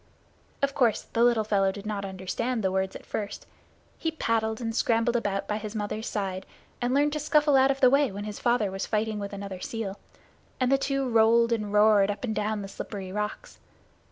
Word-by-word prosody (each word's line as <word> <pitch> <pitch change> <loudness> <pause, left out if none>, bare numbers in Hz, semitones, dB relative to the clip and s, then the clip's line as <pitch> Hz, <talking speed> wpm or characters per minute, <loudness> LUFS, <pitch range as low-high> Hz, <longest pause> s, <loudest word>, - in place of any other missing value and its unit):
Of 280 0 +2
course 240 -6 +2
the 230 - +3
little 240 -2 +4
fellow 195 -2 +2
did 200 +1 -9
not 205 -2 -3
understand 195 +5 -3
the 190 - +1
words 190 0 -1
at - - -9
first. 205 -1 -5 0.5
He 325 - 0
paddled 225 -8 -1
and 225 -2 -3
scrambled 230 0 +2
about 200 -4 -1
by 210 0 -1
his 215 0 -7
mother's 215 +1 -3
side, 190 -2 -3 0.3
and 245 0 0
learned 290 +2 +2
to 305 - -1
scuffle 300 -1 +3
out 265 0 +5
of 275 0 -1
the 255 - +7
way 280 -2 +3
when 200 +1 -6
his 210 -1 -6
father 235 -5 +1
was 195 +1 -4
fighting 215 -1 -1
with 200 -1 -5
another 200 -2 -6
seal, 205 -1 -5 0.6
and 255 0 +2
the 275 - +5
two 275 -1 -1
rolled 230 0 +4
and 210 -3 -1
roared 210 -1 +5
up 205 - -4
and 230 -3 -1
down 210 0 -1
the - - -6
slippery 195 -1 -7
rocks. 210 - -5
220 Hz, 210 wpm, -27 LUFS, 200-245 Hz, 0.6 s, the